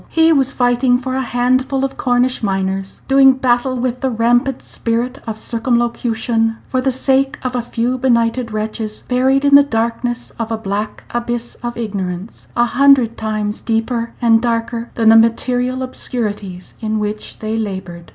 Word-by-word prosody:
He 325 Hz, 0 st, +4 dB
was 275 Hz, -2 st, +2 dB
fighting 245 Hz, 0 st, +2 dB
for 260 Hz, +1 st, -4 dB
a 265 Hz, -, 0 dB
handful 255 Hz, +2 st, +1 dB
of 270 Hz, -, -5 dB
Cornish 250 Hz, 0 st, +1 dB
miners; 195 Hz, -1 st, -2 dB
doing 270 Hz, 0 st, +6 dB
battle 255 Hz, 0 st, +1 dB
with 250 Hz, 0 st, -2 dB
the 265 Hz, -, +1 dB
rampant 245 Hz, +3 st, +1 dB
spirit 240 Hz, +3 st, -2 dB
of 220 Hz, -1 st, -3 dB
circumlocution 230 Hz, -1 st, 0 dB
for 255 Hz, -, 0 dB
the 265 Hz, +1 st, +1 dB
sake 270 Hz, +2 st, +1 dB
of 255 Hz, -1 st, -2 dB
a 245 Hz, -, 0 dB
few 240 Hz, +2 st, -2 dB
benighted 235 Hz, -1 st, +1 dB
wretches, 215 Hz, 0 st, -4 dB
buried 265 Hz, +2 st, +2 dB
in 280 Hz, -, +3 dB
the 285 Hz, -, +10 dB
darkness 235 Hz, -1 st, -2 dB
of 230 Hz, 0 st, -3 dB
a 225 Hz, -, 0 dB
black 210 Hz, 0 st, -4 dB
abyss 240 Hz, 0 st, -3 dB
of 240 Hz, 0 st, -5 dB
ignorance 195 Hz, -3 st, -5 dB
a 240 Hz, -, +3 dB
hundred 255 Hz, -2 st, +4 dB
times 215 Hz, -1 st, -3 dB
deeper 230 Hz, +1 st, -1 dB
and 225 Hz, -1 st, +5 dB
darker 235 Hz, 0 st, -2 dB
than 225 Hz, -2 st, +4 dB
the 225 Hz, -, +7 dB
material 245 Hz, +3 st, +2 dB
obscurities 205 Hz, -7 st, -4 dB
in 220 Hz, -1 st, -2 dB
which 210 Hz, 0 st, -4 dB
they 215 Hz, 0 st, -3 dB
labored. 190 Hz, -5 st, -5 dB
240 Hz, 160 wpm, -17 LUFS, 225-255 Hz, -, the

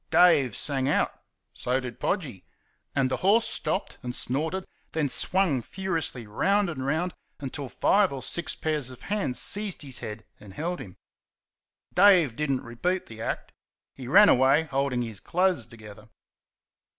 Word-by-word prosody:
Dave 145 Hz, -, +5 dB
sang 135 Hz, -2 st, 0 dB
out, -, -, +2 dB, 0.4 s
so 125 Hz, +2 st, -1 dB
did 125 Hz, -2 st, -7 dB
Podgy. 140 Hz, -, -2 dB, 0.5 s
And 135 Hz, -2 st, +2 dB
the 130 Hz, -, +1 dB
horse 210 Hz, +5 st, +4 dB
stopped 195 Hz, -, -1 dB
and 125 Hz, -1 st, -4 dB
snorted, 160 Hz, +9 st, -1 dB, 0.3 s
then 150 Hz, -3 st, 0 dB
swung 180 Hz, -4 st, +1 dB
furiously 165 Hz, -, -3 dB
round 195 Hz, -, +1 dB
and 130 Hz, -5 st, -5 dB
round 160 Hz, +6 st, 0 dB, 0.3 s
until 140 Hz, -1 st, -5 dB
five 200 Hz, -, +3 dB
or 135 Hz, -2 st, -6 dB
six 170 Hz, -2 st, -4 dB
pairs 150 Hz, -5 st, -2 dB
of 130 Hz, -1 st, -12 dB
hands 200 Hz, -11 st, -2 dB
seized 205 Hz, -5 st, -4 dB
his 135 Hz, -3 st, -5 dB
head 105 Hz, +1 st, -7 dB
and 100 Hz, -2 st, -13 dB
held 175 Hz, +3 st, -3 dB
him. 90 Hz, -, -10 dB, 1.0 s
Dave 180 Hz, -, +6 dB
did 150 Hz, +2 st, -2 dB
n't 135 Hz, -2 st, 0 dB
repeat 175 Hz, +11 st, -2 dB
the 110 Hz, -1 st, -10 dB
act. -, -, -3 dB, 0.4 s
He 130 Hz, -2 st, -9 dB
ran 205 Hz, +10 st, +8 dB
away 135 Hz, +3 st, +5 dB
holding 135 Hz, -4 st, -1 dB
his 110 Hz, -4 st, -6 dB
clothes 180 Hz, -, +1 dB
together. 105 Hz, -1 st, -13 dB
140 Hz, 155 wpm, -27 LUFS, 125-180 Hz, 1.0 s, ran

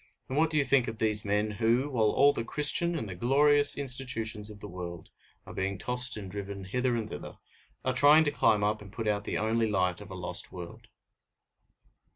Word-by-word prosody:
And 130 Hz, -, -5 dB
what 160 Hz, +2 st, +2 dB
do 155 Hz, -, -2 dB
you 145 Hz, -, +2 dB
think 135 Hz, -4 st, +2 dB
of 115 Hz, -, -6 dB
these 110 Hz, -1 st, 0 dB
men, 105 Hz, +1 st, -1 dB
who, 120 Hz, +4 st, +1 dB
while 110 Hz, -4 st, +1 dB
all 140 Hz, +5 st, +3 dB
the 115 Hz, -, -4 dB
Christian 150 Hz, +6 st, +3 dB
and 110 Hz, -, -5 dB
the 95 Hz, -, -7 dB
glorious 145 Hz, +8 st, +4 dB
institutions 120 Hz, -6 st, -1 dB
of 105 Hz, -1 st, -12 dB
the -, -, -9 dB
world 85 Hz, -1 st, -9 dB, 0.4 s
are -, -, -11 dB
being 95 Hz, +1 st, -3 dB
tossed 125 Hz, +3 st, 0 dB
and 100 Hz, -3 st, -8 dB
driven 100 Hz, 0 st, -7 dB
hither 125 Hz, +6 st, -2 dB
and 115 Hz, -2 st, -3 dB
thither, -, -, -9 dB, 0.5 s
are 130 Hz, -, 0 dB
trying 145 Hz, +5 st, +5 dB
to 145 Hz, -, -1 dB
climb 110 Hz, -6 st, +1 dB
up 105 Hz, +1 st, -1 dB
and 100 Hz, -2 st, -13 dB
put 110 Hz, +1 st, -5 dB
out 105 Hz, -1 st, -1 dB
the -, -, -3 dB
only 110 Hz, +1 st, 0 dB
light 90 Hz, -2 st, -1 dB
of 105 Hz, -, -12 dB
a 95 Hz, -, -8 dB
lost 90 Hz, -1 st, -5 dB
world? 90 Hz, -2 st, -11 dB
110 Hz, 210 wpm, -28 LUFS, 100-130 Hz, 0.5 s, trying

